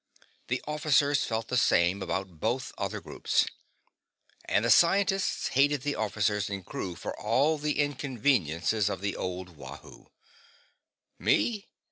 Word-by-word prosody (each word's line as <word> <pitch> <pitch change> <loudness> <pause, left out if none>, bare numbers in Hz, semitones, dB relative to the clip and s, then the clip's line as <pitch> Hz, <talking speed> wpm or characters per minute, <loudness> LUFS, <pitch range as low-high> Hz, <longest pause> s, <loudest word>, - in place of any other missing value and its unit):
The 125 +1 -2
officers 145 -1 +2
felt 115 0 -3
the 125 - 0
same 90 -4 +3
about 95 -3 -4
both 120 +7 -2
other - - -3
groups. - - 0 1.0
And - - +1
the - - +3
scientists 195 +1 +3
hated 140 0 +2
the 145 0 0
officers 105 -2 0
and 100 -3 -5
crew 90 -3 -5
for - - -6
all 150 +3 +2
the 150 0 -1
inconveniences 120 - +1
of 100 - -4
the 100 0 -2
old 90 0 -4
Wahoo. 70 - -12 1.1
Me? 215 -3 +1
120 Hz, 130 wpm, -28 LUFS, 100-145 Hz, 1.1 s, same